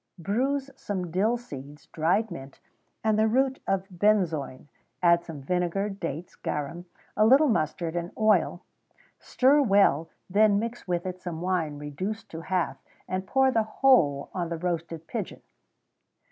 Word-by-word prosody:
_ - - -11
Bruise 270 - 0
some 185 -8 -4
dill 210 +7 +2
seeds, 145 - -10
dried 180 +7 0
mint, 135 -4 -9 0.4
and 215 -1 +2
the 220 - +4
root 265 +3 +1
of 195 0 0
benzoin; 175 -9 0 0.4
add 170 0 +5
some 155 -5 -9
vinegar, 180 +5 0
dates, 170 -4 -5
garum, 160 +5 -4 0.3
a 215 - +4
little 270 +7 +6
mustard, 165 -4 -1
and 170 0 -2
oil; 210 -5 +2 0.6
stir 275 +3 +3
well; 195 - +3 0.2
then 205 +1 +4
mix 230 0 -4
with 175 0 -1
it 185 0 -5
some 170 -3 -5
wine 170 -5 -1
reduced 185 +10 -5
to 165 - -6
half, 170 -6 -2 0.2
and 185 0 -3
pour 265 +3 +3
the 225 - +2
whole 215 - +3
on 175 -3 -2
the 170 - -3
roasted 165 -1 -3
pigeon. - - -5
185 Hz, 150 wpm, -27 LUFS, 165-215 Hz, 0.6 s, little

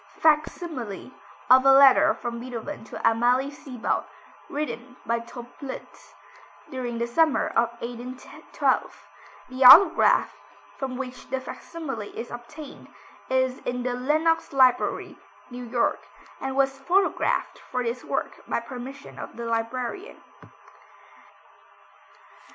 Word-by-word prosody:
[Illustration: 305 -1 +4
Fac - - -11
simile 255 - -7 0.4
of 260 +1 +8
a 270 - +7
letter 270 -1 +7
from 235 -1 -5
Beethoven 250 +4 -7
to - - -8
Amalie 245 +4 +2
Seebald, 255 -5 -3 0.4
written 255 -4 -5
by 235 0 0
Töplitz; 245 +3 -10 0.6
during 245 -3 -4
the 235 - -1
summer 310 +6 +2
of 235 0 +2
1812. 245 +2 -3 0.4
The 255 +1 -1
autograph, 315 +10 +7 0.4
from 265 -2 -5
which 255 -1 -7
the 265 - -1
fac 260 - -9
simile 300 -9 -6 0.2
is 230 - -6
obtained, 275 +5 -10 0.4
is 260 0 +1
in 245 0 -4
the 250 0 -1
Lenox 310 +6 +1
Library, 255 -2 +2 0.3
New 245 0 -7
York, 235 0 0 0.4
and 265 0 -4
was 270 0 +1
photographed 370 +8 0
for 250 -1 -1
this 240 +1 -3
work - - -3
by - - 0
permission 265 +2 -9
of - - -8
the 235 - -5
librarian. 245 - -3
255 Hz, 120 wpm, -25 LUFS, 240-275 Hz, 0.6 s, of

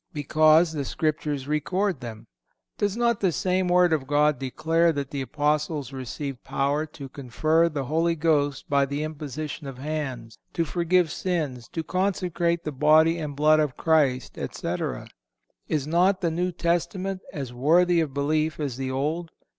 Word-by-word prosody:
Because 155 +2 +4
the 150 -3 -3
Scriptures 150 -2 -2
record 180 +4 0
them. 110 -2 -8 0.5
Does 205 +1 0
not 235 -2 +2
the 190 -3 +2
same 185 +2 0
Word 180 -1 +4
of 140 -4 -1
God 150 -1 +2
declare 165 +5 +1
that 140 -3 -4
the 140 - -3
Apostles 150 +1 -1
received 135 0 -6
power 145 +3 0
to 145 -2 -9
confer 155 +6 +1
the 145 -3 -3
Holy 165 +4 +1
Ghost 145 -4 +1
by 140 -1 +2
the 140 +2 -3
imposition 155 -1 -5
of 135 -2 -7
hands, 135 -5 -5
to 165 - 0
forgive 175 0 +1
sins, 150 -10 -2
to 165 - -4
consecrate 175 -2 0
the 155 - -3
Body 155 +4 +4
and 150 -3 -5
Blood 155 +2 +4
of 150 -4 0
Christ, 145 -6 +1
etc. - - -4 0.6
Is 150 -3 -1
not 180 +5 +2
the 170 -3 +1
New 180 +3 -1
Testament 180 +3 -1
as 135 -5 -6
worthy 170 +7 +3
of 155 -4 -2
belief 155 +3 0
as 140 -5 -3
the 135 -1 -3
Old? 155 +6 -2
155 Hz, 160 wpm, -25 LUFS, 140-170 Hz, 0.6 s, Because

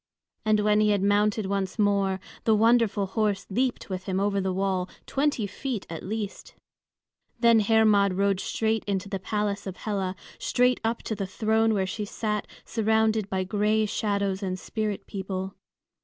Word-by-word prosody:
And 215 -1 +3
when 210 0 +3
he 215 0 +4
had 200 -2 +2
mounted 205 +1 +2
once 195 0 -2
more, 200 -2 +2 0.2
the 220 - +4
wonderful 225 -2 +3
horse 205 0 -1
leaped 250 +5 0
with 185 -1 -5
him 190 -1 -1
over 200 0 +1
the 190 0 -1
wall, 190 -1 -1 0.2
twenty 280 -5 0
feet 235 +1 -4
at 165 - -5
least! 210 0 -5 0.8
Then 230 -1 +6
Hermod 210 -2 +4
rode 195 0 +2
straight 220 +1 0
into 200 -1 -2
the 195 -2 -3
palace 205 0 -2
of 185 - -6
Hela, 195 -3 -2 0.2
straight 250 0 +2
up 225 +1 -1
to - - -3
the 200 -2 -3
throne 220 +2 +2
where 190 -2 +1
she 210 +3 -4
sat 210 0 -2 0.2
surrounded 220 -1 +1
by 190 -1 0
gray 210 +3 +1
shadows 200 -2 -1
and 185 -2 -2
spirit 210 +1 -3
people. 190 -1 -4
205 Hz, 165 wpm, -26 LUFS, 195-220 Hz, 0.8 s, Then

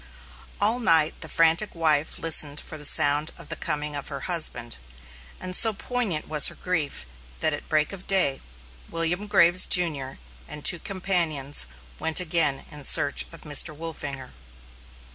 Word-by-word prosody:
All 220 +4 +1
night 165 -9 +2
the - - -8
frantic 165 +5 +1
wife 155 -2 0
listened 150 -2 +2
for - - -7
the 150 -1 -2
sound 145 +2 +4
of 170 -3 -14
the - - -3
coming 150 -2 -3
of 145 - -6
her 140 - -7
husband, 155 -9 0 0.6
and 185 0 -6
so 225 +2 +4
poignant 205 -7 -3
was 150 -2 +3
her - - -6
grief 160 - -4 0.3
that - - +2
at - - -8
break 155 +4 0
of 190 -1 -10
day, 185 -9 +2 0.5
William 170 +5 -2
Graves, 175 -2 +4
Jr., 150 -7 +1 0.3
and 150 - -9
two 175 - +6
companions 165 - 0 0.3
went 160 +1 +1
again 165 -5 0
in 150 -1 -9
search 140 +1 +3
of 165 - -12
Mr. 150 +1 +1
Wolfinger. 145 -5 -7
160 Hz, 155 wpm, -24 LUFS, 145-180 Hz, 0.6 s, two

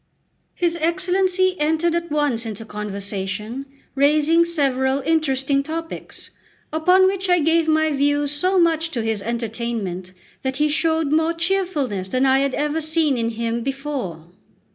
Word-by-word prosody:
His 345 -1 0
Excellency 370 +2 +1
entered 320 +3 +1
at 340 0 -2
once 290 -6 0
into 225 -1 -6
conversation, 210 +4 -4 0.3
raising 300 +4 +4
several 275 -5 0
interesting 275 -2 +1
topics, 325 +3 -7 0.4
upon 360 +4 +4
which 385 0 0
I 355 - +5
gave 325 0 +2
my 315 0 +2
views 290 0 +1
so 365 +6 +2
much 330 -1 +2
to 235 -4 -1
his 220 -2 -1
entertainment 225 -5 -4 0.3
that 265 0 -2
he 300 +1 +2
showed 320 -1 +1
more 320 +2 +2
cheerfulness 330 - -1
than 255 +7 +1
I 265 0 +4
had 275 -1 0
ever 300 +2 -1
seen 315 -2 +1
in 230 -1 -1
him 230 +1 -2
before. 265 - -4
290 Hz, 140 wpm, -21 LUFS, 235-330 Hz, 0.4 s, I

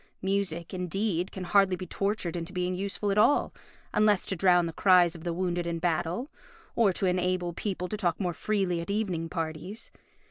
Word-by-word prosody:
Music, 190 -4 -1
indeed, 180 0 -1
can 190 - -6
hardly 195 0 +3
be 185 - -6
tortured 195 -2 -2
into 170 0 -4
being 180 -1 -1
useful 200 +2 -2
at 200 - +2
all, 255 +7 +3 0.4
unless 210 -2 +3
to 195 - -2
drown 180 -1 +4
the 165 - -4
cries 180 -3 +5
of 165 -2 -10
the 175 - -1
wounded 175 0 -1
in 170 0 -1
battle, 175 - -1 0.4
or 225 -4 +4
to 190 - -2
enable 180 -1 0
people 180 0 -3
to 215 - -4
talk 175 -5 0
more 180 -3 -1
freely 190 -2 0
at 170 - -8
evening 190 -6 -1
parties. 165 +6 -4
180 Hz, 185 wpm, -28 LUFS, 170-200 Hz, 0.4 s, cries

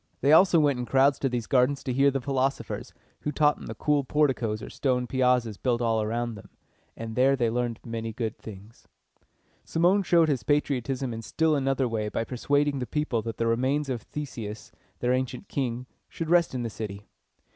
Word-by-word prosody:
They 140 - +3
also 170 +1 +6
went 145 -4 +2
in 125 - -4
crowds 135 +1 +3
to 135 - 0
these 120 -2 -2
gardens 135 +2 +2
to 130 - -2
hear 135 +2 +4
the 135 0 -1
philosophers, 135 +1 -2 0.3
who 150 - -3
taught 150 -1 +2
in - - -9
the - - -6
cool 150 -2 +1
porticoes 130 -7 0
or - - -7
stone 125 -2 0
piazzas 125 -4 +1
built 120 -2 0
all 115 -2 +1
around 115 +2 -2
them, 105 - -12 0.5
and 115 -1 -6
there 135 +2 +4
they 120 -4 0
learned 120 -1 -2
many 115 -1 -4
good 110 -1 -3
things. 105 +1 -12 0.8
Cimon 180 +5 +2
showed 170 -3 +4
his 140 -6 0
patriotism 135 0 0
in 115 - -5
still 155 +9 +1
another 135 -1 +1
way 110 -2 -2
by 115 - -2
persuading 145 +4 0
the 125 - -3
people 150 -7 -1
that 115 0 -6
the 115 - 0
remains 130 +5 +1
of 125 -3 -2
Theseus, 115 -6 -7 0.3
their 125 +1 +2
ancient 130 +9 -3
king, 125 -3 -3 0.2
should 165 -1 -4
rest 170 -5 +3
in 125 - -2
the 115 - -4
city. 105 -2 -7
125 Hz, 195 wpm, -27 LUFS, 115-145 Hz, 0.8 s, also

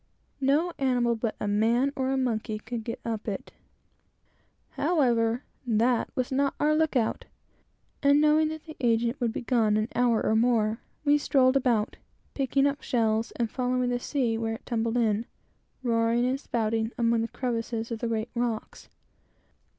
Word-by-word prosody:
No 295 +6 +2
animal 245 -3 +2
but 225 -1 -2
a 210 - -2
man 230 +7 +2
or 265 0 0
monkey 225 -4 -1
could 225 +1 -6
get 230 +1 -5
up 225 -1 -3
it. 200 -3 -4 1.2
However, 240 -7 +1 0.2
that 235 +1 +2
was 255 0 -1
not 275 +1 +1
our 300 +1 +3
look 315 -1 +1
out; 230 -3 0 0.8
and 280 0 +5
knowing 305 +1 +4
that 315 0 -6
the 315 -1 -10
agent 235 +1 +1
would 235 -2 +1
be - - -5
gone 225 -4 +2
an 215 +2 -1
hour 240 -2 +2
or 220 - +2
more, 225 -1 +2 0.3
we 295 0 +4
strolled 260 -2 +3
about, 240 -5 +1 0.4
picking 275 0 +1
up 285 0 0
shells, 225 -2 0
and 235 - -1
following 250 -1 0
the 245 - 0
sea 240 -4 -1
where 225 0 -2
it - - -13
tumbled 230 0 -1
in, 225 -1 +1 0.6
roaring 230 0 +2
and 260 +2 0
spouting, 225 -3 -1
among 230 -1 +2
the 225 - -1
crevices 230 -1 -3
of 230 - -3
the 235 - -2
great 225 0 -2
rocks. 235 -2 -3
240 Hz, 165 wpm, -27 LUFS, 225-265 Hz, 1.2 s, and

